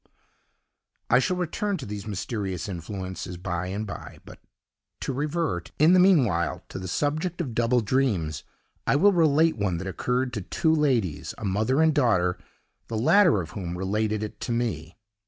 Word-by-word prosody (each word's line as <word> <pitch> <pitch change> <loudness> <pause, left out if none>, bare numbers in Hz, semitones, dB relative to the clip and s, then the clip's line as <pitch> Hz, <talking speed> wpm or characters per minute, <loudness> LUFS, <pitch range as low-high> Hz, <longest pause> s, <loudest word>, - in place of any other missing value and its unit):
I 125 - +7
shall 180 +8 0
return 190 +3 -1
to 140 - -7
these 105 -1 -6
mysterious 100 -2 -3
influences 95 0 -6
by 90 0 -3
and 100 +3 -3
by; 100 - -8
but - - -12 0.6
to 135 - -2
revert, 145 - -2
in 155 +4 +6
the 185 - +6
meanwhile, 125 - +3
to - - -6
the 95 - -6
subject 155 - -1
of 140 -9 -3
double 120 +2 +2
dreams, 100 - 0 0.4
I - - +3
will 200 +7 +5
relate 160 -2 +3
one 100 -4 0
that 95 - -5
occurred 125 +6 -1
to 105 - -3
two 160 - +1
ladies, 120 - 0
a 110 - -6
mother 110 +10 +2
and 160 -1 +4
daughter, 105 - +2 0.5
the 115 - -3
latter 170 - +5
of 80 - -8
whom 90 -4 -5
related 105 +3 -1
it 105 - -7
to - - -4
me. 90 -9 -2
110 Hz, 170 wpm, -26 LUFS, 95-150 Hz, 0.6 s, I